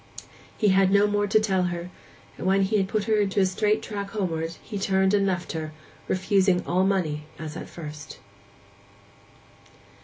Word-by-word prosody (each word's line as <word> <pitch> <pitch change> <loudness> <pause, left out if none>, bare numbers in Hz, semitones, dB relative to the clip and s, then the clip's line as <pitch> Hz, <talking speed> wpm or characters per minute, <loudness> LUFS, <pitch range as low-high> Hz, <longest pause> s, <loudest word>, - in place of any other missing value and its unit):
He 210 - +3
had 190 0 +4
no 200 +1 +5
more 205 0 +1
to 210 +2 +4
tell 190 -4 +1
her; 175 0 -4 0.4
and, - - -4
when 195 +1 +3
he 210 +3 +1
had 195 -2 +1
put 215 +1 -1
her 215 0 +1
into 200 -1 +1
a 190 - +5
straight 210 +3 +1
track 200 -3 -5
homeward, 165 -6 -2 0.2
turned 190 0 +2
and 200 -1 +3
left 180 -2 -2
her, 155 -1 -5 0.3
refusing 190 -1 +2
all 180 +2 +2
money 160 -6 0
as 155 -1 -7
at - - -7
first. 150 -3 -9
190 Hz, 165 wpm, -25 LUFS, 175-205 Hz, 0.4 s, no